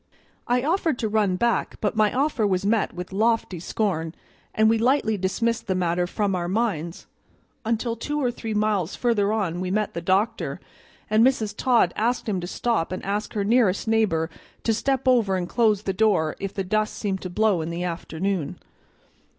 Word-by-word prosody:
I 245 +1 +2
offered 320 -2 +1
to 225 - -1
run 210 -3 +1
back, 235 +5 0
but 210 0 -1
my 215 -1 +3
offer 260 -5 +1
was 190 0 0
met 215 0 +2
with 180 +1 -7
lofty 220 -3 +1
scorn, 165 -3 -2 0.4
and 220 0 +3
we 225 0 +3
lightly 235 -2 +2
dismissed 215 +5 -1
the 190 - 0
matter 175 0 0
from 205 +1 -1
our 175 -1 -2
minds, 180 -5 -2 0.6
until 230 +1 0
two 295 +6 -3
or 250 -4 +1
three 225 -2 -5
miles 210 -5 0
further 215 -4 +1
on 190 -6 -1
we 185 0 -2
met 210 +2 0
the 170 - -4
doctor, 190 +5 0 0.5
and 215 +1 +4
Mrs. 230 -5 +2
Todd 235 -9 +3
asked 235 +3 0
him 195 -4 -1
to 175 - -5
stop 225 -4 -1
and 185 - -5
ask 205 +2 -2
her 205 - -1
nearest 220 -2 +2
neighbor 190 -8 +1 0.3
to 225 - +2
step 270 +3 -1
over 230 -7 +4
and 180 -1 -2
close 215 -2 +2
the 195 - -1
door 185 -6 +2
if 195 -1 -3
the 195 - -3
dust 215 +3 0
seemed 195 -3 -2
to 185 - -5
blow 200 -1 +2
in 160 - -4
the 170 +1 -3
afternoon. 175 0 -3
210 Hz, 190 wpm, -24 LUFS, 185-230 Hz, 0.6 s, and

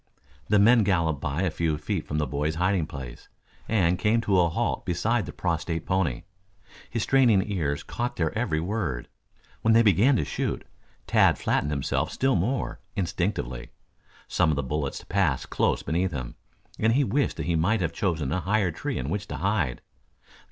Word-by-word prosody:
The 105 - +5
men 115 +4 +6
galloped 85 -7 +1
by 70 +6 -1
a 90 - +1
few 80 -1 -1
feet 90 +1 -3
from 75 - -2
the 75 - +1
boy's 75 +2 -2
hiding 90 -1 +1
place 65 -4 -9 0.4
and 90 -5 +2
came 110 +4 +2
to 100 -4 +2
a 85 -1 +4
halt 80 - -1
beside 110 +3 0
the - - -5
prostrate 80 -1 -2
pony. 90 -10 0 0.7
His 115 -2 -2
straining 120 -8 +4
ears 70 -7 -1
caught 120 +1 -3
their 80 +2 -1
every 110 -9 0
word. 85 - -3 0.5
When 110 0 +4
they 115 - +6
began 110 - +4
to 75 - 0
shoot, 70 - -3 0.4
Tad - - +4
flattened 75 - 0
himself 70 -3 -1
still 135 0 +1
more, 115 +9 -1 0.2
instinctively. 85 - -2 0.6
Some 85 -3 +2
of 75 - +2
the 70 - -1
bullets 70 +1 -3
passed 90 -9 0
close - - +1
beneath 90 +5 0
him, 65 -4 -5 0.5
and 110 +1 +3
he 140 +3 +3
wished 140 +2 0
that - - -3
he 85 - 0
might 95 +7 +2
have 80 -2 -1
chosen 80 -9 -1
a 90 - 0
higher 95 +1 +1
tree - - -4
in 65 - -3
which 100 +6 -3
to - - -5
hide. 90 - 0
90 Hz, 180 wpm, -26 LUFS, 75-105 Hz, 0.7 s, men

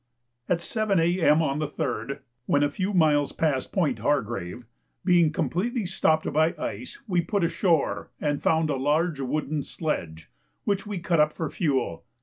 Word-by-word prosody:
At 170 -1 +1
7 210 0 0
A.M. 165 -2 +3
on 140 -1 0
the 155 - -1
3rd, 140 -5 -3 0.3
when 145 0 +3
a 145 - +1
few 185 +6 -2
miles 150 -6 +3
past 145 -5 0
Point 175 -6 0
Hargrave, 120 -11 -1 0.4
being 170 -3 +5
completely 215 +8 -1
stopped 160 -3 +1
by 160 +3 +3
ice, 120 -5 -5
we 180 -4 +2
put 200 +2 -1
ashore 170 -2 +1
and 145 -1 -1
found 160 -1 +2
a 140 - 0
large 150 +3 +1
wooden 150 +2 -1
sledge, 85 - -4 0.3
which 200 0 -1
we 205 -2 -3
cut 170 -1 0
up 150 0 +4
for 160 -4 -4
fuel. 135 - -1
155 Hz, 160 wpm, -26 LUFS, 145-175 Hz, 0.4 s, being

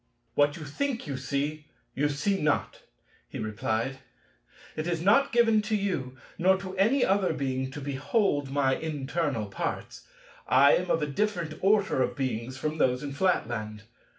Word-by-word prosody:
"What 145 +1 +2
you 155 - -7
think 240 - -2
you 140 -4 -4
see, 145 +3 -3 0.3
you 145 +2 +1
see 190 +8 0
not," 150 -1 0 0.5
he - - -7
replied; 110 +4 -2 0.8
"it 155 +2 -3
is 170 -2 0
not 205 +11 +4
giving 225 -3 +4
to 215 +1 -1
you, 175 -11 -2 0.2
nor 190 +2 +4
to 190 0 -7
any 225 +8 +3
other 190 -3 +2
Being, 130 -3 -2
to 135 - -7
behold 145 - 0
my 135 -1 +2
internal 145 -5 -2
parts. 100 - -5 0.4
I 140 +2 +6
am 180 - -2
of 160 - +2
a - - +2
different 170 +1 -1
order 200 -7 +3
of - - 0
Beings 130 -1 -3
from 155 +3 -3
those 125 0 +2
in 145 - -4
Flatland. 115 - -1
145 Hz, 160 wpm, -28 LUFS, 130-190 Hz, 0.8 s, I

